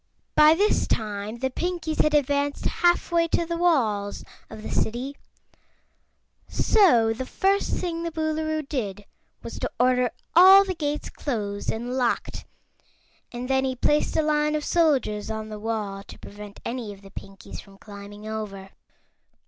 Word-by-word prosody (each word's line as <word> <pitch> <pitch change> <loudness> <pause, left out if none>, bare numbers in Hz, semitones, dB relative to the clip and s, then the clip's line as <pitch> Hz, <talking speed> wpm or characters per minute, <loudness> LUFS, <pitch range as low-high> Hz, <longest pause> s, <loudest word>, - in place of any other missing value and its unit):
By 305 +1 +7
this 410 +5 +2
time 210 0 -2
the 260 +2 -2
Pinkies 340 0 -1
had 305 0 +2
advanced 285 0 0
halfway 345 -1 +2
to 335 - 0
the 335 0 -3
walls 230 -13 +1 0.3
of 215 - -10
the - - -6
City, 250 +5 -2 1.3
so 240 - +4
the 255 +3 -6
first 395 +1 +1
thing 335 -2 -2
the 335 - -2
Boolooroo 315 -1 -2
did 205 -8 -4 0.4
was - - -7
to - - -2
order 250 0 +3 0.3
all 380 +3 +9
the 380 - -2
gates 300 -3 -3
closed 205 -7 -3
and 240 +3 -4
locked 245 -2 -1 0.9
and 245 +1 -5
then 265 0 +2
he 260 -1 -1
placed 295 +6 +1
a 315 - +3
line 300 0 +1
of 300 - -2
soldiers 275 -11 +1
on 220 0 -4
the 215 -1 -7
wall 210 -3 -3
to - - -12
prevent 205 0 -11
any 235 -3 -4
of 200 0 -13
the 195 - -13
Pinkies 195 -1 -10
from 195 -1 -18
climbing 205 +1 -11
over. 200 -3 -6
255 Hz, 155 wpm, -25 LUFS, 215-315 Hz, 1.3 s, all